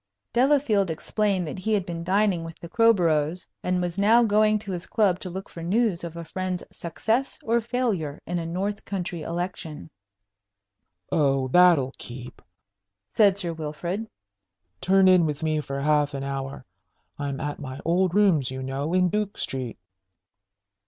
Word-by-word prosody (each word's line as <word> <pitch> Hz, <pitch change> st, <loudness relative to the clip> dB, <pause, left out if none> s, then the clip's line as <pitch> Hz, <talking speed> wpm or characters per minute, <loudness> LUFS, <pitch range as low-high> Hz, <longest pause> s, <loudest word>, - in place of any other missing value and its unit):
Delafield 245 Hz, -7 st, +3 dB
explained 190 Hz, +3 st, 0 dB
that 160 Hz, -, -6 dB
he 220 Hz, +4 st, -1 dB
had 200 Hz, -4 st, +1 dB
been 170 Hz, -2 st, -5 dB
dining 190 Hz, -1 st, +2 dB
with 165 Hz, 0 st, -8 dB
the 170 Hz, -, -9 dB
Crowboroughs, 175 Hz, -6 st, +2 dB, 0.2 s
and 180 Hz, 0 st, 0 dB
was 175 Hz, +2 st, -3 dB
now 225 Hz, +4 st, +5 dB
going 215 Hz, 0 st, +3 dB
to 205 Hz, -2 st, -7 dB
his 175 Hz, -1 st, -5 dB
club 195 Hz, -5 st, +2 dB
to 185 Hz, -, -6 dB
look 190 Hz, +3 st, -6 dB
for 170 Hz, -, -10 dB
news 190 Hz, +1 st, +1 dB
of 170 Hz, -1 st, -6 dB
a 170 Hz, -, -6 dB
friend's 185 Hz, +1 st, -3 dB
success 225 Hz, +10 st, -1 dB
or 235 Hz, +1 st, +2 dB
failure 220 Hz, -, -2 dB
in 175 Hz, +1 st, -2 dB
a 165 Hz, -, -4 dB
north 195 Hz, +5 st, -3 dB
country 180 Hz, -4 st, -4 dB
election. 165 Hz, -2 st, -5 dB, 1.2 s
"Oh, 135 Hz, -4 st, +2 dB
that'll 165 Hz, -5 st, +5 dB
keep!" 125 Hz, 0 st, -9 dB, 0.7 s
said 200 Hz, -3 st, +5 dB
Sir 175 Hz, -4 st, -2 dB
Wilfrid. 170 Hz, +7 st, -4 dB, 0.7 s
"Turn 190 Hz, 0 st, +4 dB
in 185 Hz, -2 st, +6 dB
with 150 Hz, 0 st, -4 dB
me 155 Hz, -1 st, +1 dB
for 140 Hz, -1 st, -5 dB
half 150 Hz, 0 st, +2 dB
an 135 Hz, -, -4 dB
hour. 135 Hz, -1 st, -5 dB, 0.5 s
I'm 140 Hz, -2 st, -3 dB
at 145 Hz, -1 st, -4 dB
my 130 Hz, -2 st, -7 dB
old 180 Hz, +2 st, +2 dB
rooms, 180 Hz, -11 st, +3 dB
you 130 Hz, 0 st, -5 dB
know, 135 Hz, +5 st, -3 dB
in 180 Hz, 0 st, +4 dB
Duke 210 Hz, +1 st, -2 dB
Street." 130 Hz, -3 st, -4 dB
175 Hz, 160 wpm, -25 LUFS, 150-200 Hz, 1.2 s, in